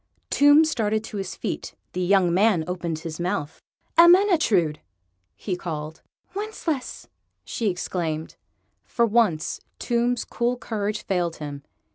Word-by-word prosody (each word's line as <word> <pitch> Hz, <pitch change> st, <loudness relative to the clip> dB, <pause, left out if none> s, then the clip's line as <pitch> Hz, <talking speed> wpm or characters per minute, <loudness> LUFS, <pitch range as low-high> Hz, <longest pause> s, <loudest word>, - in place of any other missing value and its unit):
Tomb 290 Hz, +2 st, +6 dB
started 220 Hz, -7 st, 0 dB
to 215 Hz, -, -7 dB
his 190 Hz, -1 st, -4 dB
feet. -, -, -5 dB, 0.2 s
The 185 Hz, -, -2 dB
young 180 Hz, -1 st, +3 dB
man 195 Hz, -3 st, +3 dB
opened 170 Hz, -2 st, -3 dB
his 160 Hz, 0 st, -7 dB
mouth. 170 Hz, -4 st, -3 dB, 0.4 s
"Ermyntrude!" 335 Hz, -, +5 dB, 0.6 s
he 190 Hz, -, -3 dB
called. 160 Hz, -3 st, -6 dB, 0.3 s
"Wencheslaus!" 385 Hz, -9 st, -4 dB, 0.4 s
she 225 Hz, -3 st, -1 dB
exclaimed. 165 Hz, -3 st, -3 dB, 0.5 s
For 235 Hz, -, +2 dB
once 210 Hz, -9 st, +1 dB, 0.2 s
Tomb's 240 Hz, +1 st, 0 dB
cool 240 Hz, +1 st, -1 dB
courage 215 Hz, -3 st, -3 dB
failed 175 Hz, -4 st, -1 dB
him. 145 Hz, -2 st, -7 dB
200 Hz, 120 wpm, -24 LUFS, 170-240 Hz, 0.6 s, Tomb